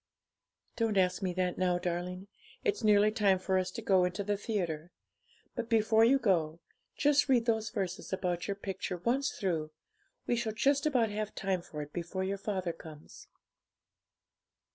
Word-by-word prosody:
'Don't 225 -3 +1
ask 185 +1 +2
me 185 -2 0
that 180 0 -1
now, 180 -1 +2
darling; 180 +2 -3 0.4
it's 415 - 0
nearly 210 0 +5
time 200 -3 +3
for 185 0 +1
us 185 - -1
to 230 - -7
go 190 -3 +4
into 180 +3 -1
the 205 +1 0
theatre. 175 -7 -3 0.6
But 235 0 -4
before 220 0 +4
you 255 +4 +6
go, 170 -9 +1 0.4
just 290 0 +3
read 245 -3 +4
those 220 -2 +1
verses 195 -4 -4
about 180 -2 -2
your 200 - -1
picture 190 -2 -4
once 245 +9 +1
through; 165 -6 -2 0.6
we 240 - +1
shall 230 -2 -2
just 280 +6 +2
about 240 -7 +2
have 210 0 -4
time 190 -3 -1
for 150 -3 -6
it 145 - -13
before 175 +2 -3
your 195 +1 -2
father 190 -4 -2
comes.' 155 -2 -12
195 Hz, 165 wpm, -31 LUFS, 180-220 Hz, 0.6 s, you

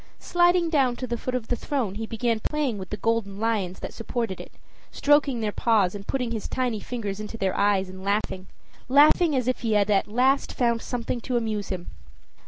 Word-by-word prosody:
Sliding 350 -1 +2
down 265 -6 +3
to 255 - -4
the 240 -1 -2
foot 255 +2 -3
of 235 -3 -3
the 245 - +1
throne 240 -5 -2
he 220 +2 -5
began 230 0 0
playing 275 -4 -1
with 185 - -7
the 210 - -4
golden 215 -2 -1
lions 210 -5 -1
that - - -6
supported 230 -4 -3
it, - - -12 0.4
stroking 285 -4 +3
their 215 -1 0
paws 205 -5 +2
and 200 -1 -8
putting 250 -3 -1
his 220 -3 -3
tiny 250 -4 -1
fingers 210 -3 -4
into 215 +2 -6
their 190 -3 0
eyes, 200 -2 +2
and 185 0 -10
laughing 200 -2 -1 0.4
laughing 300 +3 +5
as 250 -2 0
if 255 - 0
he 225 -2 0
had 210 0 +3
at 195 - +3
last 255 +6 +2
found 235 -2 +1
something 240 0 -3
to 245 +1 -1
amuse 215 -3 -2
him. 180 -2 -4
230 Hz, 205 wpm, -25 LUFS, 205-255 Hz, 0.4 s, laughing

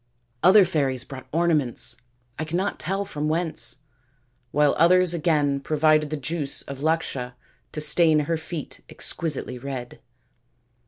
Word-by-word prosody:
Other 190 +3 +7
fairies 140 -7 -1
brought 130 -1 -10
ornaments 155 -6 0 0.4
I - - -1
cannot 170 +5 -2
tell 195 +5 -2
from 150 -5 -3
whence 160 -4 0 0.7
while 145 +2 +3
others 180 +1 +5
again 150 -4 +1
provided 155 +1 +2
the 155 - -3
juice 145 0 -3
of 140 -1 -8
l&csha 145 -6 -1 0.4
to 150 - -4
stain 155 0 +4
her 165 +3 -1
feet 160 -1 -7
exquisitely 145 -6 -3
red." 130 -2 -6
155 Hz, 125 wpm, -24 LUFS, 140-170 Hz, 0.7 s, Other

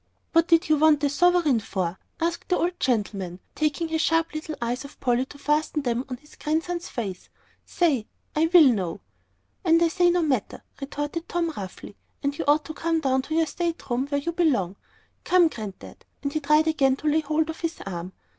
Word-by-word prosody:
"What 330 0 +4
did 330 -1 +4
you 310 0 +4
want 300 -1 +4
a 285 - +3
sovereign 345 -5 +3
for?" 190 -4 -3 0.2
asked 335 +1 -2
the 360 - +3
old 350 +1 -1
gentleman, 205 -7 -1
querulously, - - -37
taking 305 +2 0
his 320 0 0
sharp 330 -1 +1
little 310 0 -5
eyes 240 +2 -2
off 280 - -12
Polly 250 +1 +1
to 285 - -12
fasten 300 +1 0
them 245 0 -1
on 250 - -4
his 295 +3 -19
grandson's 335 +3 -2
face. 195 -7 -5 0.4
"Say, 285 -11 +1 0.3
I 315 +2 +3
will 350 -3 +9
know." 200 - +1 0.6
"And 330 -2 +5
I 335 -1 +3
say 355 +1 +3
no 350 0 +2
matter," 260 -9 -1 0.2
retorted 290 +4 -4
Tom, 335 -2 -1
roughly. 195 +1 -8 0.3
"And 280 0 0
you - - -4
ought 300 +1 +4
to 315 - -6
come 330 +1 0
down 265 -3 +1
to 315 +4 -4
your 325 0 +3
state 335 -1 -3
room 255 +3 0
where 285 0 0
you 340 - -2
belong. 260 - +1 0.5
Come, 355 -2 +4
Granddad!" 215 -8 -9 0.2
And 280 0 -2
he 310 - 0
tried 305 +2 +3
again 275 -4 +3
to 305 - -5
lay 305 +1 +4
hold 310 +2 0
of 320 - -11
his 330 -1 -3
arm. 180 -1 -5
300 Hz, 205 wpm, -25 LUFS, 250-330 Hz, 0.6 s, will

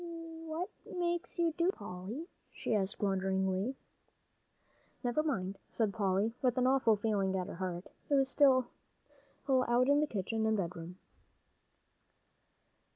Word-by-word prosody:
"What 325 +3 -3 0.3
makes 345 0 -1
you 335 -2 +2
do 340 0 +2
so, - - -2
Polly?" 205 - -6 0.2
she - - -2
asked 200 -2 0
wonderingly. 190 +3 +1 1.3
"Never 245 +5 +2
mind," 195 -11 -2
said 215 -4 0
Polly, 200 +1 +1
with 250 -1 +2
an 255 - +3
awful 255 -4 +4
feeling 205 -2 0
at 185 - -1
her 190 - -7
heart, 180 0 -3 0.2
it 285 - +4
was 270 -1 +3
so 265 -3 +5 0.8
still 260 -2 +4
out 240 +2 +4
in 285 +1 +5
the 300 - +2
kitchen 220 0 -1
and 220 0 +2
bedroom. 175 -1 -4
225 Hz, 140 wpm, -33 LUFS, 190-270 Hz, 1.3 s, so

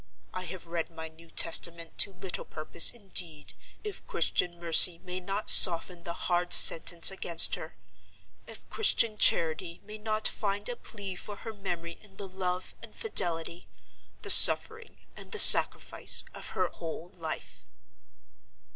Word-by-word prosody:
I 185 0 -9
have 180 +1 -12
read 165 0 -8
my 160 -1 -12
New 165 +1 -22
Testament 165 0 -2
to 200 - 0
little 190 0 -8
purpose, 160 +1 +2
indeed, 180 -8 -3 0.3
if 420 -2 -10
Christian 175 -1 -5
mercy 170 +1 +3
may 180 0 -9
not 195 +3 -9
soften 175 0 +6
the 170 - -8
hard 175 0 -3
sentence 170 +2 +3
against 170 -3 +1
her—if - - -15
Christian 230 - -2
charity 170 -2 -1
may 215 +1 -14
not 215 0 -2
find 205 -1 -5
a 245 - -8
plea 200 -5 -11
for 205 +3 -11
her 225 +2 -12
memory 170 -4 -10
in 200 -2 -24
the 200 - -10
love 185 -1 -8
and - - -17
fidelity, 175 - -4 0.6
the - - +1
suffering 450 0 +4 0.2
and - - -14
the - - -6
sacrifice, - - +4
of - - -11
her - - -3
whole 165 +1 -12
life. 165 -4 -11
180 Hz, 145 wpm, -25 LUFS, 170-200 Hz, 0.6 s, soften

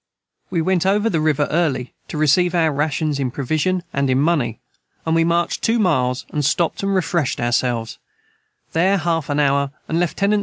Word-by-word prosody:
We 170 -3 0
went 185 +1 +1
over 210 +3 +2
the 160 -4 0
River 150 -2 +1
Early 150 -7 0
to - - -6
receive 170 +4 +3
our 165 -2 +3
rations 150 0 -1
in 135 -2 0
provision 155 +7 -1
and 140 -1 0
in 130 0 +2
money 140 -8 +1 0.5
and 160 - 0
we 165 0 +3
marched 170 +1 0
2 230 +1 +2
Miles 130 - +1
and 150 - -1
stoped 165 +4 0
and 195 0 0
refreshed 170 -5 0
ourselves 120 -1 -1 0.7
their 185 +5 +3
half 165 -4 -1
an 145 0 0
hour 140 -1 +2 0.2
and 165 - 0
Lieut. 175 -3 0
155 Hz, 180 wpm, -20 LUFS, 140-175 Hz, 0.7 s, receive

